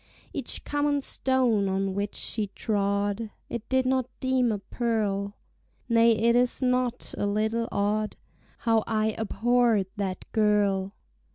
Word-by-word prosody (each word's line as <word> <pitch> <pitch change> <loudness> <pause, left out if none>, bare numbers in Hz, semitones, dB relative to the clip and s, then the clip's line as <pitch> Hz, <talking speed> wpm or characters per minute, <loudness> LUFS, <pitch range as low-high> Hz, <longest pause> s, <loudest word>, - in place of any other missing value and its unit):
Each - - -2
common 290 -1 0
stone 250 -7 +1
on 195 0 -1
which 200 +1 -3
she 215 -2 0
trod 205 +1 -1 0.2
I 235 - -3
did 260 0 +2
not 260 -1 +1
deem 260 -2 +2
a 210 - -1
pearl: 205 -1 -2 0.5
Nay 230 0 +5
it 235 +2 +3
is 245 0 +2
not 250 -1 0
a 205 - +1
little 220 +3 0
odd 210 +1 0 0.4
How 225 -2 +2
I 220 -1 +1
abhorr'd 230 -1 +2
that 190 -3 -3
girl. 205 -2 +2
220 Hz, 130 wpm, -27 LUFS, 205-245 Hz, 0.5 s, Nay